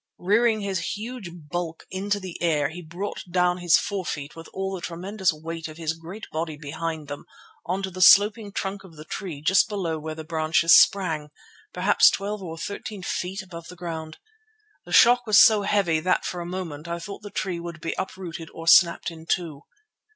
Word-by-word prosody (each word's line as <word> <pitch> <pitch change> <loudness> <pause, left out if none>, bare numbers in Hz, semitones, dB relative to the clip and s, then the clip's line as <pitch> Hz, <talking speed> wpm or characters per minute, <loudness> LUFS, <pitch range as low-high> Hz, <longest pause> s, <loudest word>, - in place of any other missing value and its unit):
Rearing 215 +4 +2
his 195 -2 -2
huge 230 -3 -6
bulk 165 0 -6
into 200 +2 -1
the 185 -3 -8
air 150 -4 +2
he 175 +3 -8
brought 175 +5 -6
down 180 0 +2
his 175 -2 +5
forefeet 170 -8 -4
with 165 0 -10
all 190 0 -3
the 185 - -5
tremendous 185 +3 -1
weight 165 +1 -6
of 155 0 -11
his 160 -1 -2
great 170 +7 -9
body 160 -1 -3
behind 155 +1 -5
them 145 0 -7 0.4
on 185 +3 -1
to 190 - -3
the 185 0 -6
sloping 205 +2 +6
trunk 195 0 -4
of 175 -4 -15
the 155 0 -11
tree 160 -5 -6
just 185 +5 +4
below 175 -6 -2
where 155 +1 -6
the 160 - -7
branches 160 +1 +3
sprang, 160 -6 +3 0.4
perhaps 190 +3 +5
twelve 205 +1 -3
or 165 -3 -7
thirteen 200 +3 -6
feet 185 +3 -3
above 170 -3 -10
the 180 - -10
ground. 165 -3 -6 0.7
The - - -11
shock 245 0 +6
was 210 -2 +5
so 215 -1 +7
heavy 195 -5 +1
that 180 +3 +1
for 180 - -4
a 170 - -6
moment 170 -4 -6
I 170 0 -3
thought 200 +5 -8
the 205 - -8
tree 185 -3 -3
would 170 0 -7
be 165 - -3
uprooted 180 -3 -6
or 165 - -7
snapped 170 0 +5
in 165 0 -12
two. 165 -5 -2
175 Hz, 195 wpm, -25 LUFS, 160-195 Hz, 0.7 s, so